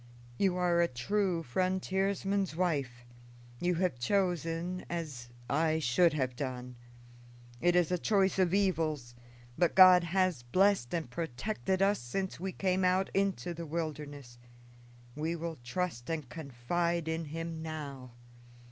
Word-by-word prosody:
"You 190 -2 +3
are 175 -1 +2
a 170 - +4
true 175 +6 -1
frontiersman's 190 +4 0
wife; 140 -9 -1 0.5
you 175 0 +1
have 170 -8 0
chosen 175 +2 0
as 150 -8 -5 0.2
I 155 +3 +2
should 160 +4 +3
have 130 -4 -1
done. 125 -2 -5 0.9
It 175 +1 +3
is 175 -1 +3
a 180 - +1
choice 195 -1 +2
of 180 -2 +3
evils; 160 -10 0 0.5
but 175 -2 +2
God 185 -2 +8
has 185 -5 +1
blessed 185 +2 +2
and 165 -5 -2
protected 175 - -2
us 200 +1 +3
since 185 +11 -4
we 190 +2 -3
came 185 0 0
out 185 +1 +2
into 195 -3 0
the 170 0 -7
wilderness 145 -6 -5 0.8
we 160 +3 -2
will 165 -3 -5
trust 125 -2 -3
and 155 -5 -3
confide 160 +5 -2
in 160 0 -2
him 165 +1 -5
now. 140 -6 -6
170 Hz, 135 wpm, -31 LUFS, 145-185 Hz, 0.9 s, God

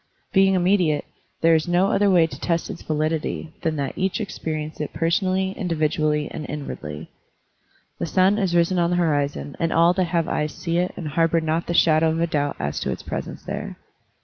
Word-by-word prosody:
Being 195 0 +5
immediate, 180 -4 +2 0.4
there 165 0 +5
is 160 +1 +2
no 175 +3 +2
other 205 0 +3
way 175 -4 +5
to 165 - -8
test 170 -1 -1
its 175 - -9
validity 155 +1 -2
than 160 -1 0
that 140 -2 -3
each 190 +3 -1
experience 155 -7 -4
it 150 - -4
personally, 185 +3 +1
individually, 155 -5 0
and 155 - -5
inwardly. 80 - -6 0.9
The - - -1
stm 190 +5 +3
is 180 -3 0
risen 175 +2 +3
on 170 0 +2
the 175 - +1
horizon 145 - 0
and 165 0 0
all 170 +2 +5
that 185 0 +1
have 165 -1 0
eyes 150 0 -2
see 170 -1 -1
it 180 +1 0
and 165 -5 -4
harbor 165 +2 +2
not 160 +1 -1
the 170 - -1
shadow 160 -1 +4
of 160 +1 -1
a 170 - +3
doubt 145 -3 -1
as 70 +1 -3
to - - -3
its - - -4
presence - - -5
there. - - -5
165 Hz, 200 wpm, -23 LUFS, 155-180 Hz, 0.9 s, Being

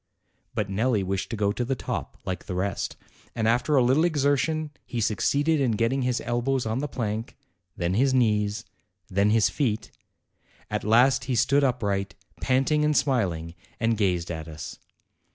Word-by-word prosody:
But 105 -2 0
Nelli 105 +2 +1
wished 95 0 -2
to 115 - -3
go 100 -1 +1
to 120 - -2
the 135 +2 -1
top - - -5
like 90 -1 -4
the 90 - -3
rest, 95 +2 -2 0.4
and 110 -1 0
after 125 +6 +2
a 130 - +5
little 130 +6 +3
exertion 150 0 +1
he 120 - -5
succeeded 140 +8 +1
in 125 -4 +2
getting 115 +5 +1
his 125 -1 0
el 120 0 -1
bows 135 0 0
on 110 +3 -1
the 145 - -2
plank, 110 -3 -4 0.4
then 85 +1 0
his 130 +6 +3
knees, 105 -4 +1 0.4
then 100 +2 +2
his 110 -1 +3
feet; 115 -7 -1 0.8
at - - -1
last 120 +5 +4
he 130 - -1
stood 140 +4 +3
upright, 100 -7 0 0.3
panting 135 +4 +2
and 150 -1 +2
smiling, 95 - 0 0.3
and 115 -1 +2
gazed 90 -5 0
at 80 -1 -5
us. 80 -1 -8
115 Hz, 170 wpm, -26 LUFS, 100-135 Hz, 0.8 s, a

